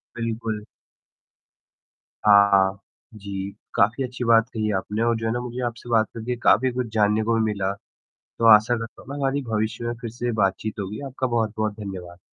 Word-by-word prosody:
बिल्कुल। 115 -2 -3 1.6
हाँ 100 -2 +6 0.4
जी, 100 -1 -5 0.2
काफ़ी 115 +7 +2
अच्छी 125 0 -5
बात 115 +1 +4
कही 110 -1 -1
आपने 105 +3 -3
और 120 0 +2
जो 115 - -4
है - - 0
ना 120 - -1
मुझे 125 +1 -5
आपसे 120 0 -6
बात 110 -2 +3
करके 115 +2 -3
काफ़ी 130 +3 +4
कुछ 125 -1 -2
जानने 105 0 +2
को 115 +1 +1
भी 115 - +2
मिला। 100 -1 -1 0.7
तो 115 - +2
आशा 110 +3 +4
करता 115 0 -8
हूँ - - -19
ना 140 - -5
हमारी 140 0 -1
भविष्य 110 +2 -1
में 120 0 -2
फ़िर 115 -3 -5
से 120 +1 -3
बातचीत 105 +3 -1
होगी, 100 +4 -5
आपका 130 0 -2
बहुत-बहुत 110 -2 -1
धन्यवाद। 90 -3 -7
110 Hz, 180 wpm, -24 LUFS, 105-120 Hz, 1.6 s, हाँ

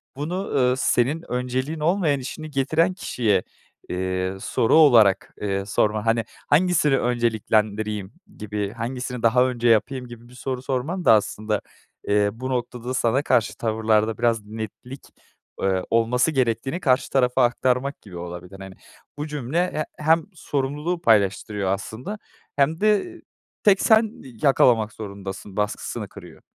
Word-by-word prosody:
bunu, 175 +8 -4
eee, 125 -1 +3
senin 135 +5 0
önceliğin 130 +5 -2
olmayan 160 -3 +1
işini 155 +4 -7
getiren 155 +6 +1
kişiye, 110 - 0 0.5
eee, 95 +1 -2
soru 110 - +1
olarak, 115 -11 +5
eee, 100 -1 -1
sorma. 105 +1 0
Hani, 115 0 +2 0.3
hangisini 150 -3 +3
önceliklendireyim 110 -3 0 0.2
gibi, 105 -1 -3
hangisini 125 +1 -5
daha 125 +2 +4
önce 120 -2 -1
yapayım 125 +3 +1
gibi 120 0 -12
bir - - -16
soru 130 0 -4
sorman 140 +8 -3
da - - +8
aslında, 105 0 0 0.5
eee, 105 0 +3
bu 130 +3 -6
noktada 125 -1 -3
sana 125 +1 +1
karşı 120 -6 +1
tavırlarda 110 -1 +1
biraz 115 -3 +1
netlik, 110 +5 -8 0.5
eee, 95 -1 +1
olması 115 +6 +2
gerektiğini 130 +2 0
karşı 130 -6 +2
tarafa 125 -1 +2
aktarmak 125 +3 0
gibi 95 -5 -11
olabilir. 90 +2 -8
Hani, 95 -1 -10 0.4
bu 150 +1 -4
cümle 150 +5 -1
he 155 - -1 0.2
hem 160 +1 +3
sorumluluğu 150 +2 -2
paylaştırıyor 100 - +2
aslında 110 - -4 0.4
hem 145 +4 +2
de 215 - +1 0.4
"Tek 200 -2 +5
sen 220 -1 +4 0.3
yakalamak 115 -6 +4
zorundasın" 100 -1 -8
baskısını 105 0 -3
kırıyor. - - -13
125 Hz, 135 wpm, -23 LUFS, 105-140 Hz, 0.5 s, da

